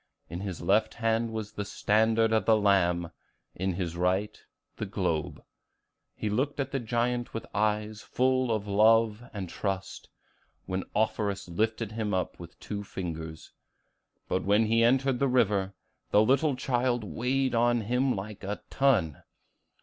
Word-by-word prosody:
In 85 Hz, -, -4 dB
his 95 Hz, -3 st, -5 dB
left 105 Hz, +3 st, +2 dB
hand 115 Hz, 0 st, 0 dB
was 110 Hz, -1 st, -5 dB
the 105 Hz, -1 st, -4 dB
standard 110 Hz, +2 st, +2 dB
of 110 Hz, -, +2 dB
the 110 Hz, -1 st, +5 dB
Lamb; 90 Hz, -5 st, +2 dB, 0.4 s
in 95 Hz, +1 st, -2 dB
his 85 Hz, -2 st, -3 dB
right, 90 Hz, +4 st, 0 dB, 0.4 s
the -, -, -3 dB
globe. 80 Hz, -2 st, -2 dB, 0.7 s
He -, -, -3 dB
looked 130 Hz, +8 st, -1 dB
at 135 Hz, -1 st, -2 dB
the 135 Hz, -, -1 dB
giant 120 Hz, +1 st, -1 dB
with 115 Hz, -, -4 dB
eyes 105 Hz, 0 st, 0 dB
full 130 Hz, -1 st, +1 dB
of 105 Hz, -2 st, -1 dB
love 110 Hz, +2 st, +4 dB
and 100 Hz, -3 st, -5 dB
trust, 95 Hz, +1 st, -4 dB, 0.6 s
and 95 Hz, 0 st, -2 dB
Offerus 100 Hz, -2 st, 0 dB
lifted 110 Hz, +4 st, -1 dB
him 110 Hz, -3 st, -2 dB
up 90 Hz, -, -2 dB
with 85 Hz, -1 st, -11 dB
two 105 Hz, -1 st, -5 dB
fingers; 80 Hz, -4 st, -6 dB, 0.7 s
but 95 Hz, -, -1 dB
when 105 Hz, +3 st, +3 dB
he 115 Hz, +1 st, +3 dB
entered 130 Hz, +1 st, +3 dB
the 140 Hz, -, +3 dB
river, 100 Hz, -6 st, +1 dB, 0.3 s
the 105 Hz, -, +5 dB
little 140 Hz, +4 st, +3 dB
child 125 Hz, -2 st, 0 dB
weighed 130 Hz, +5 st, -1 dB
on 120 Hz, 0 st, +3 dB
him 125 Hz, +4 st, +1 dB
like 100 Hz, +1 st, -7 dB
a 100 Hz, +2 st, -4 dB
ton. 110 Hz, -, +2 dB
110 Hz, 150 wpm, -28 LUFS, 95-120 Hz, 0.7 s, the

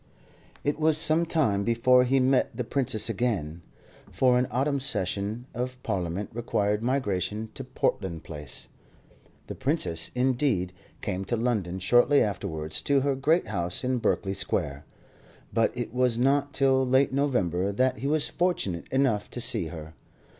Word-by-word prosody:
It 145 Hz, +1 st, -1 dB
was 155 Hz, -1 st, +3 dB
some 165 Hz, +1 st, +4 dB
time 110 Hz, -12 st, +1 dB
before 125 Hz, +3 st, +4 dB
he 135 Hz, +2 st, +2 dB
met 130 Hz, 0 st, +2 dB
the 125 Hz, -, -1 dB
Princess 130 Hz, -2 st, -1 dB
again, 100 Hz, -8 st, -2 dB, 0.5 s
for 125 Hz, -1 st, +3 dB
an 125 Hz, -, 0 dB
autumn 140 Hz, +4 st, 0 dB
session 105 Hz, -1 st, -2 dB
of 125 Hz, +1 st, -4 dB
Parliament 90 Hz, +2 st, -3 dB
required 105 Hz, -3 st, 0 dB
migration 110 Hz, -4 st, -1 dB
to 135 Hz, -, -7 dB
Portland 95 Hz, -9 st, -2 dB
Place. 75 Hz, -4 st, -7 dB, 0.8 s
The -, -, -6 dB
Princess, 80 Hz, -1 st, -1 dB
indeed, 125 Hz, -8 st, +1 dB, 0.3 s
came 95 Hz, -1 st, -3 dB
to 120 Hz, -, -1 dB
London, 110 Hz, -7 st, -1 dB
shortly 120 Hz, +9 st, +4 dB
afterwards, 80 Hz, -6 st, -2 dB
to 140 Hz, -1 st, +2 dB
her 140 Hz, +1 st, +1 dB
great 155 Hz, +6 st, +2 dB
house 90 Hz, -1 st, -2 dB
in 130 Hz, 0 st, 0 dB
Berkeley 95 Hz, -3 st, 0 dB
Square; 70 Hz, -6 st, -2 dB, 0.7 s
but 115 Hz, -, +2 dB
it 120 Hz, -2 st, -4 dB
was 125 Hz, -2 st, +2 dB
not 140 Hz, +3 st, +2 dB
till 135 Hz, -2 st, +3 dB
late 130 Hz, +1 st, +3 dB
November 100 Hz, -, +1 dB
that 130 Hz, +2 st, +1 dB
he 135 Hz, -, -2 dB
was 150 Hz, 0 st, +1 dB
fortunate 175 Hz, -, -1 dB
enough 130 Hz, -6 st, +1 dB
to -, -, -6 dB
see 90 Hz, -7 st, +1 dB
her. 80 Hz, -1 st, -9 dB
120 Hz, 150 wpm, -27 LUFS, 95-135 Hz, 0.8 s, some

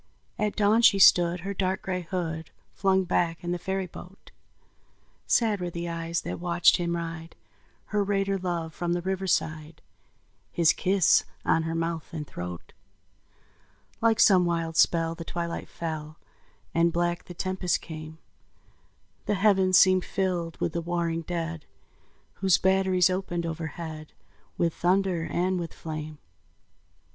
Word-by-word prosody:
At 210 Hz, -1 st, 0 dB
dawn 215 Hz, +2 st, +3 dB
she 215 Hz, -4 st, +6 dB
stood 175 Hz, -2 st, +5 dB
her 200 Hz, +3 st, -4 dB
dark 190 Hz, -1 st, -1 dB
gray 185 Hz, -1 st, -2 dB
hood 165 Hz, -2 st, -4 dB, 0.2 s
Flung 190 Hz, -1 st, +2 dB
back 170 Hz, -1 st, -1 dB
in 175 Hz, -, -3 dB
the 175 Hz, -, -2 dB
ferry 190 Hz, +2 st, -2 dB
boat; 180 Hz, +2 st, -13 dB, 1.0 s
Sad 215 Hz, -5 st, +2 dB
were 175 Hz, -, -2 dB
the 170 Hz, 0 st, -5 dB
eyes 165 Hz, 0 st, -3 dB
that -, -, -5 dB
watched 175 Hz, 0 st, +4 dB
him 170 Hz, -1 st, -1 dB
ride, 165 Hz, -1 st, -6 dB, 0.6 s
Her 205 Hz, -1 st, +2 dB
raider 195 Hz, -1 st, 0 dB
love, 170 Hz, -3 st, -3 dB
from 175 Hz, 0 st, -2 dB
the 175 Hz, 0 st, -2 dB
riverside, 165 Hz, -5 st, -2 dB, 0.7 s
His 165 Hz, -2 st, +4 dB
kiss 190 Hz, -2 st, +3 dB, 0.2 s
on 165 Hz, -, +3 dB
her 165 Hz, 0 st, -3 dB
mouth 165 Hz, -1 st, -3 dB
and 150 Hz, -2 st, -4 dB
throat. 90 Hz, -, -8 dB, 1.3 s
Like 225 Hz, -1 st, +3 dB
some 185 Hz, -3 st, +6 dB
wild 165 Hz, -2 st, -1 dB
spell 165 Hz, 0 st, +3 dB
the 165 Hz, 0 st, -7 dB
twilight 170 Hz, 0 st, -4 dB
fell, 155 Hz, -2 st, -6 dB, 0.6 s
And 170 Hz, +1 st, +3 dB
black 175 Hz, 0 st, -1 dB
the 180 Hz, -, -10 dB
tempest 185 Hz, 0 st, -1 dB
came; 155 Hz, -1 st, -9 dB, 1.1 s
The 205 Hz, -, +1 dB
heavens 190 Hz, -2 st, +4 dB
seemed 185 Hz, -1 st, +5 dB
filled 180 Hz, -4 st, -2 dB
with 160 Hz, -, -1 dB
the 170 Hz, -, -1 dB
warring 170 Hz, -1 st, -1 dB
dead, 165 Hz, -1 st, -4 dB, 0.8 s
Whose 190 Hz, -2 st, +4 dB
batteries 190 Hz, -1 st, +3 dB
opened 175 Hz, -2 st, -2 dB
overhead 160 Hz, -1 st, -6 dB, 0.4 s
With 170 Hz, -1 st, +1 dB
thunder 180 Hz, -2 st, +1 dB
and 180 Hz, +3 st, 0 dB
with 170 Hz, -2 st, -6 dB
flame. 155 Hz, -1 st, -6 dB
175 Hz, 140 wpm, -27 LUFS, 165-190 Hz, 1.3 s, she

